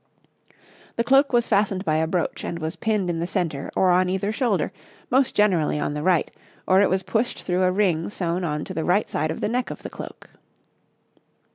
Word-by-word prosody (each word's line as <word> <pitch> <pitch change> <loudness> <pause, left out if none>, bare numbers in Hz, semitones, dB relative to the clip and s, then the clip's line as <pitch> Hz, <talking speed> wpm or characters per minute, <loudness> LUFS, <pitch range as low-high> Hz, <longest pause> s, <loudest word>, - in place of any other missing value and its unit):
The 230 - +1
cloak 270 +3 +4
was 240 -2 +2
fastened 200 -2 +1
by 155 -2 +2
a 160 0 +1
brooch, 175 0 -2
and 170 - -4
was 160 0 -4
pinned 215 -4 0
in 170 -1 -1
the 170 - -2
centre 165 -7 -2
or 185 -1 +4
on 180 +1 +3
either 190 +2 -1
shoulder, 215 - 0 0.4
most 260 +1 +2
generally 180 -8 +2
on 145 - -1
the 150 - -3
right; 175 0 +2 0.4
or 190 +1 +5
it 200 - +3
was 190 +1 0
pushed 220 +6 -1
through 180 0 0
a 185 0 +3
ring 180 -4 +1
sewn 180 -2 -2
on 150 -3 -2
to - - -7
the 160 - -2
right 185 +5 +2
side 155 +2 -1
of 160 - -4
the - - +1
neck 245 +3 -1
of - - -8
the - - -7
cloak. - - -10
185 Hz, 215 wpm, -24 LUFS, 165-210 Hz, 0.4 s, or